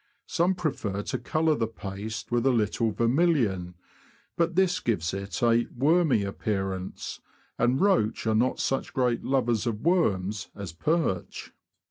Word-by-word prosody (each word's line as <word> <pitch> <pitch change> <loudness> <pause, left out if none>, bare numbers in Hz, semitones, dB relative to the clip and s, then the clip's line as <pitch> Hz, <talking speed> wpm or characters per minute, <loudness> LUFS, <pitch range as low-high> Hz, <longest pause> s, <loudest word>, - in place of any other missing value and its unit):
Some 180 +3 +1
prefer 110 - -2
to - - -3
colour 155 +5 +1
the 115 -6 0
paste 110 +1 -6
with 120 +2 +2
a - - +5
little 115 0 +1
ver 115 +3 0
milion; 115 - +1 0.6
but 170 0 0
this 185 -1 +3
gives 85 -8 -1
it 100 +1 -4
a 120 0 +4
''wormy" 150 - +2
appearance, 95 -2 -4 0.4
and 125 +3 +2
roach 185 - +2
are 110 - +2
not 120 +4 +1
such 135 - -1
great 125 -3 +1
lovers 120 -4 +1
of 110 -2 -2
worms 105 - +1
as 100 -5 -7
perch. 150 - -1
115 Hz, 145 wpm, -27 LUFS, 100-150 Hz, 0.6 s, a